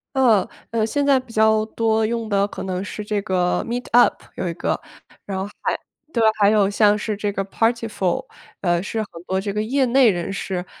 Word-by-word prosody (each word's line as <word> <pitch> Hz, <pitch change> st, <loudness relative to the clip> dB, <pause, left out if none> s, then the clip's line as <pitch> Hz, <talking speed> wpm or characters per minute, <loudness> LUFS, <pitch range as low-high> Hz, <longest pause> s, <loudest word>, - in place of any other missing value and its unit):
呃 230 Hz, -8 st, +4 dB, 0.2 s
呃， 225 Hz, -1 st, +1 dB
现 285 Hz, +5 st, 0 dB
在 275 Hz, -2 st, +5 dB
比 255 Hz, -3 st, -13 dB
较 220 Hz, 0 st, +3 dB
多 220 Hz, 0 st, +1 dB
用 230 Hz, -1 st, -2 dB
的 200 Hz, 0 st, +2 dB
可 -, -, -7 dB
能 185 Hz, -1 st, -3 dB
是 210 Hz, +1 st, -6 dB
这 210 Hz, -1 st, -1 dB
个 180 Hz, -3 st, +1 dB
Meetup， 245 Hz, 0 st, +3 dB, 0.2 s
有 185 Hz, -, -3 dB
一 170 Hz, -, -2 dB
个。 -, -, -2 dB, 0.5 s
然 195 Hz, -1 st, -4 dB
后 190 Hz, -, -2 dB, 0.2 s
还 -, -, 0 dB, 0.4 s
对， 230 Hz, -, +2 dB, 0.2 s
还 200 Hz, -1 st, +6 dB
有 205 Hz, -2 st, +3 dB
像 205 Hz, 0 st, +4 dB
是 210 Hz, -1 st, -3 dB
这 205 Hz, -1 st, -2 dB
个 195 Hz, -, -1 dB
Partiful， 225 Hz, +1 st, -1 dB, 0.4 s
呃， 175 Hz, -2 st, +1 dB
是 220 Hz, +3 st, -4 dB
很 215 Hz, -, -5 dB, 0.2 s
多 190 Hz, 0 st, 0 dB
这 200 Hz, -, -3 dB
个 210 Hz, +1 st, -1 dB
业 265 Hz, +6 st, +1 dB
内 255 Hz, 0 st, +5 dB
人 175 Hz, 0 st, -2 dB
士， 185 Hz, -2 st, -3 dB
215 Hz, 285 characters per minute, -22 LUFS, 195-230 Hz, 0.5 s, 还